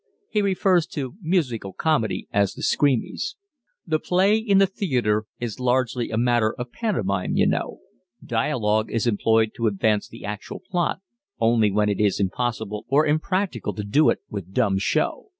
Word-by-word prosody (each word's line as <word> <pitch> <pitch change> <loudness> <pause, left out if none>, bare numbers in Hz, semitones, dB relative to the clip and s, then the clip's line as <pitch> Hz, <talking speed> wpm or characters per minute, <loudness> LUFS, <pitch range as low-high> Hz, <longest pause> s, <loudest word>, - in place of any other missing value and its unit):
[He 210 - +2
refers 190 -3 +2
to 135 -4 -5
musical 135 - -1
comedy 145 - 0
as 100 -1 +1
the - - -8
"screamies."] 145 - 0 0.5
"The 155 -2 0
play 190 +6 +3
in 220 -3 +2
the 195 - +6
theatre 125 - 0
is 120 -2 -4
largely 125 -1 0
a 110 - -2
matter 120 -2 +2
of 125 0 -6
pantomime, 100 - -1
you - - +4
know. - - -1 0.4
Dialogue 110 -2 0
is 115 - 0
employed 110 0 +2
to 115 -2 +1
advance 105 +1 +1
the - - -10
actual 105 0 -6
plot 175 +1 -2 0.4
only 115 -2 +3
when 105 +1 +1
it 100 -2 -1
is 105 -2 +2
impossible 105 +1 -2
or 145 +3 +4
impracticable 155 - -1
to 105 - -4
do 125 +10 +3
it - - +2
with 95 -2 -7
dumb 100 -5 +2
show. 100 - -1
120 Hz, 165 wpm, -23 LUFS, 105-155 Hz, 0.5 s, the